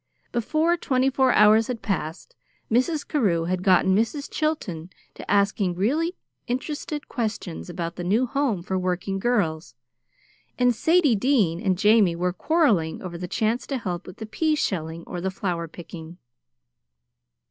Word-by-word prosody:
Before 310 +8 +1
twenty 265 -4 +1
four 260 -1 +3
hours 215 +1 +5
had 245 -3 -5
passed, 185 - -4 0.4
Mrs. 285 +6 +1
Carew 195 - +1
had 180 +2 -1
gotten 190 0 +4
Mrs. 230 +7 -1
Chilton 190 - -2 0.2
to - - -11
asking 200 -2 +2
really 305 - 0 0.3
interested 295 +4 -4
questions 215 -8 -4
about 170 -1 -5
the 175 - -4
new 215 +8 +2
Home 250 -8 -1
for 190 +1 -2
Working 185 +2 -2
Girls, 165 - -1 0.8
and 245 -1 +3
Sadie 320 +2 +3
Dean 200 -8 +2
and 190 -4 +1
Jamie 210 -3 +4
were 180 +1 -1
quarreling 215 - +1
over 180 -2 -6
the 180 +1 -5
chance 220 +6 -1
to 275 - -2
help 180 -7 -5
with 180 - -10
the 220 - -6
pea 305 +9 0
shelling 165 - -2
or 175 - -6
the 190 - -1
flower 180 -3 -3
picking. 165 0 -10
205 Hz, 150 wpm, -24 LUFS, 175-255 Hz, 0.8 s, hours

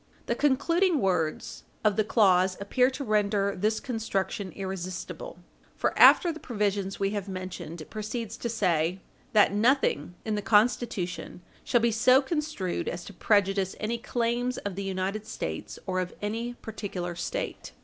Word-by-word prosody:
The - - 0
concluding 335 +5 +2
words 180 -7 -1 0.2
of 210 -2 +3
the 215 - +3
clause 190 -4 +3
appear 250 +6 +2
to 270 +1 -5
render 205 -3 +1
this 215 +4 0
construction 200 -5 -2
irresistible, 190 - -6 0.4
for, - - 0
after 345 - +7
the 320 - -8
provisions 205 -5 -2
we 195 0 +1
have 205 -1 -3
mentioned, 185 -3 -6
it - - -12
proceeds 220 +1 -4
to 235 - -3
say, 180 -5 +1 0.3
"that 210 -2 +5
nothing 210 - +2
in 220 - -1
the 210 - -1
Constitution 205 -5 +1 0.2
shall 240 - +2
be 235 0 +3
so 255 +4 +5
construed 295 - -2
as 175 0 -6
to 200 - -10
prejudice 195 -1 +2
any 230 +2 -2
claims 240 +1 -1
of 200 - -4
the 195 - -5
United 195 +3 -3
States, - - -5
or 185 -1 -1
of 180 -1 -4
any 230 +4 -3
particular 195 -6 -5
State." - - -4
205 Hz, 155 wpm, -28 LUFS, 190-235 Hz, 0.4 s, after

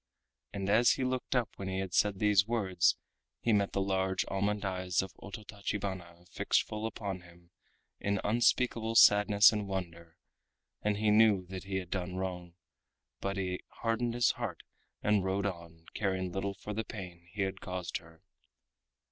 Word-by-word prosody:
And 100 -1 -4
as 110 +4 +5
he 135 - -2
looked 130 +1 -1
up 120 -3 +1
when 95 - -5
he 95 0 -2
had 95 -2 -3
said 105 0 +3
these 105 0 +4
words 100 -7 +2 0.4
he 115 - +1
met 100 -1 +2
the 100 - +1
large 95 -1 0
almond 100 +1 -1
eyes 95 -1 0
of 95 - -9
Ototachibana 100 -4 -5
fixed - - +2
full 110 +1 -4
upon 100 -4 -4
him 85 0 -19 0.5
in 100 -1 0
unspeakable 115 0 +2
sadness 105 -1 +7
and 105 -2 -2
wonder, 85 -3 -5 0.6
and 105 -1 0
he 105 0 +2
knew 105 -3 +5
that 95 0 -6
he 95 0 -4
had 90 -2 -3
done 90 -1 -3
wrong, 90 -2 -4 0.6
but 100 0 -3
he 90 -1 -2 0.2
hardened 115 +1 0
his 120 -1 +4
heart 110 -9 -5 0.4
and 105 -2 +3
rode 95 +1 0
on, 85 -3 -6
caring 95 -3 -1
little 100 +2 -2
for 105 - -6
the 110 +2 -2
pain 90 -6 -9
he 100 - 0
had 95 0 -3
caused 90 -1 -4
her. 80 -1 -17
95 Hz, 165 wpm, -32 LUFS, 90-105 Hz, 0.6 s, sadness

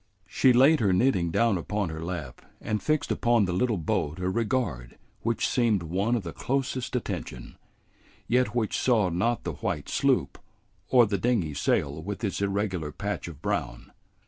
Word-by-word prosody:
She 130 - +3
laid 135 +6 +5
her 100 -4 +2
knitting 95 -4 +2
down 105 +2 +2
upon 105 +1 -2
her 80 0 -6
lap 80 -8 -6 0.2
and 105 0 -2
fixed 155 -1 0
upon 120 -3 +3
the 90 - -2
little 110 +4 +1
boat 75 -1 -1
a 90 0 -1
regard 110 - -2 0.2
which 115 0 0
seemed 115 -7 +1
one 95 +8 0
of 115 - -2
the 85 - -6
closest 130 -1 -2
attention, 90 - -5 0.7
yet 125 +1 +1
which 115 -3 0
saw 110 -7 +3
not 115 +8 0
the 85 - -3
white 70 - -3
sloop - - +1 0.5
or 125 -2 +6
the 100 -2 -1
dingy 100 -9 0
sail 70 +1 0
with 100 +5 -6
its 100 -2 -2
irregular 100 -6 -1
patch 100 +5 -4
of 80 -3 -10
brown. - - -3
100 Hz, 170 wpm, -27 LUFS, 85-120 Hz, 0.7 s, or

